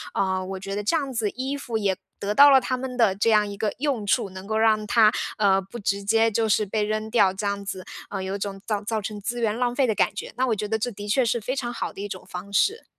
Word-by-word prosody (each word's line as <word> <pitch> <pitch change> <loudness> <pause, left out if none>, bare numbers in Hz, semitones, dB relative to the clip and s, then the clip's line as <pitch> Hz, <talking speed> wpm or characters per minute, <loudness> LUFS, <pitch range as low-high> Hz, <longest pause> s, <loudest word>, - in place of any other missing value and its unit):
呃， 190 -1 0
我 190 0 -5
觉 195 +1 -5
得 205 - -3
这 225 +11 +2
样 275 -4 -3
子， 225 -3 0
衣 265 +5 -3
服 240 -5 -3
也 200 -3 +1 0.2
得 205 +1 -1
到 285 +6 +8
了 270 - +7
它 255 0 -2
们 255 -1 -5
的 225 -6 +4
这 210 +3 +1
样 210 -1 +4
一 200 - -6
个 210 0 -1
用 265 -7 -1
处， 215 0 +1
能 190 +1 -9
够 220 0 -1
让 220 -1 +3
它， 220 -1 +5 0.3
呃， 195 -2 +3
不 195 +5 -10
直 200 -2 -1
接 225 +2 +3
就 220 +1 +1
是 210 +1 +3
被 210 +2 -1
扔 215 +1 -2
掉 205 -5 +4
这 195 +2 -4
样 200 0 -2
子， 190 -2 -6 0.2
呃， 195 -2 -4
有 190 +1 -3
种 195 -1 -5
造 210 -2 -1
造 220 +1 -2
成 210 0 -6
资 240 +4 -3
源 220 -2 0
浪 245 -1 0
费 275 - +3
的 220 - +1
感 - - +1
觉， - - -6
那 260 - +1
我 225 - +1
觉 210 +1 -3
得 220 +1 -1
这 230 - -1
的 205 -1 -8
确 235 +6 +3
是 235 +1 +1
非 250 +5 -3
常 240 -3 -3
好 - - -4
的 - - -8
一 205 - -3
种 185 -2 -8
方 190 +2 -8
式。 425 - +2
215 Hz, 310 characters per minute, -24 LUFS, 200-235 Hz, 0.3 s, 到